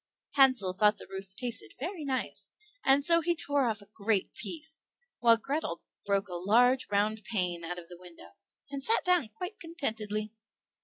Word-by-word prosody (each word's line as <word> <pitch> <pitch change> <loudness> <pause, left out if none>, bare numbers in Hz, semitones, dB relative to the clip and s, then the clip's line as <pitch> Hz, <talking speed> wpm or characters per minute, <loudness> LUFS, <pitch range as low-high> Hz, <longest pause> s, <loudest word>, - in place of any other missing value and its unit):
Hansel 260 -9 +4
thought 210 +2 +3
the - - -10
roof 190 0 -8
tasted 245 0 -2
very 335 +3 -4
nice, 265 -2 -2 0.3
and 275 +1 +4
so 335 0 +5
he 345 +1 +1
tore 285 -4 +1
off 215 -2 -2
a 205 - -23
great 210 -2 0
piece; 320 +8 -6 0.4
while 230 -1 +6
Grethel 285 +7 -3 0.2
broke 200 0 +1
a 180 - -8
large 240 +9 +3
round 210 +1 +1
pane 180 -6 -1
out 175 +2 -4
of 175 -1 -9
the 175 0 -12
window, 180 -2 -14 0.4
and 275 -1 -5
sat 450 - +4
down 360 -8 +3
quite 360 - -7
contentedly. 220 -10 -3
225 Hz, 170 wpm, -30 LUFS, 200-285 Hz, 0.4 s, while